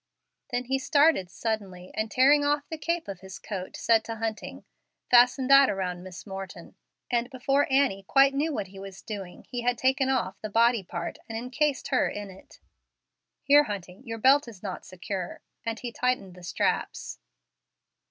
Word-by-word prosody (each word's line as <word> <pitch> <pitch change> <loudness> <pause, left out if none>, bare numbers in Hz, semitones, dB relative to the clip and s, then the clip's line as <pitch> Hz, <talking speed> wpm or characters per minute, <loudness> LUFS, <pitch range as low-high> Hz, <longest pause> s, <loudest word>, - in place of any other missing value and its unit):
Then 245 -1 -1
he 265 +2 -1
started 285 - +3
suddenly, 195 -5 -4
and 220 0 -2
tearing 280 +6 +5
off 290 0 +1
the 320 - -4
cape 335 +2 -2
of 195 -3 -6
his 190 0 -9
coat, 190 -3 -6
said 225 -1 +3
to 225 - -4
Hunting, 220 -1 -5 0.5
"Fasten 250 +2 +6
that 275 0 +8
around 180 -2 -2
Miss 185 -1 -10
Morton;" 195 -2 -8 0.4
and 240 0 +1
before 275 +2 +1
Annie 265 -8 +3
quite 275 0 +5
knew 295 +4 0
what 205 -9 -3
he 195 0 -12
was 195 -1 -10
doing 195 -5 -7
he 245 -1 -3
had 245 0 +1
taken 265 0 +2
off 255 -8 -1
the 215 - -4
body 230 +1 +3
part 175 -2 -6
and 225 - -4
incased 260 +4 -1
her - - +2
in 205 -1 -6
it. 190 - -16 0.8
"Here, 290 +1 +6
Hunting, 190 -2 -6
your 225 -3 -5
belt 270 +4 +4
is 215 -5 -12
not 190 -3 -6
secure"; 185 0 -6 0.2
and 225 0 -2
he 245 - -5
tightened 240 -6 -1
the 180 - -14
straps. 175 - -2
230 Hz, 175 wpm, -27 LUFS, 195-270 Hz, 0.8 s, that